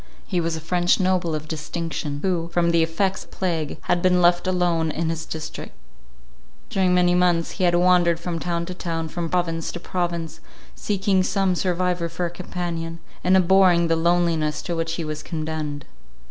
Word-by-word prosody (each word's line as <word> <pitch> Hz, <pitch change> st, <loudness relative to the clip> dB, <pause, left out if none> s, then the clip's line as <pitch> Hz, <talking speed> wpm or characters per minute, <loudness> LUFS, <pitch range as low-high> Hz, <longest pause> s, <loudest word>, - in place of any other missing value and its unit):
He 180 Hz, -2 st, -1 dB
was 165 Hz, 0 st, -1 dB
a -, -, -4 dB
French 175 Hz, +3 st, +2 dB
noble 185 Hz, -3 st, +1 dB
of 155 Hz, 0 st, -5 dB
distinction, 155 Hz, -2 st, -4 dB
who, 175 Hz, -3 st, 0 dB
from 170 Hz, 0 st, +2 dB
the 170 Hz, -1 st, +3 dB
effects 175 Hz, +4 st, 0 dB
of -, -, -23 dB
plague, 165 Hz, -5 st, -2 dB
had 175 Hz, -, 0 dB
been 180 Hz, 0 st, +3 dB
left 175 Hz, +1 st, +3 dB
alone 175 Hz, -3 st, +1 dB
in 160 Hz, +1 st, -1 dB
his 165 Hz, 0 st, -5 dB
district; 160 Hz, -1 st, -6 dB, 1.0 s
during 185 Hz, -2 st, +2 dB
many 180 Hz, 0 st, +4 dB
months, 175 Hz, -2 st, +2 dB
he 185 Hz, -, -1 dB
had 175 Hz, 0 st, +3 dB
wandered 175 Hz, -1 st, +4 dB
from 170 Hz, -1 st, -3 dB
town 170 Hz, 0 st, -2 dB
to 180 Hz, -, -6 dB
town, 165 Hz, -3 st, -3 dB
from 170 Hz, 0 st, -3 dB
province 165 Hz, -2 st, -1 dB
to 175 Hz, -, -5 dB
province, 170 Hz, -2 st, -3 dB, 0.3 s
seeking 195 Hz, -2 st, +1 dB
some 190 Hz, 0 st, +1 dB
survivor 180 Hz, -1 st, 0 dB
for 170 Hz, +2 st, -3 dB
a 170 Hz, -, -3 dB
companion, 170 Hz, -2 st, -4 dB, 0.3 s
and 185 Hz, +1 st, +5 dB
abhorring 180 Hz, -2 st, +4 dB
the 165 Hz, -, +3 dB
loneliness 165 Hz, -2 st, +1 dB
to 175 Hz, -, -3 dB
which 165 Hz, 0 st, -2 dB
he 165 Hz, -, -3 dB
was 155 Hz, 0 st, -4 dB
condemned. 155 Hz, -3 st, -4 dB
170 Hz, 180 wpm, -23 LUFS, 165-180 Hz, 1.0 s, and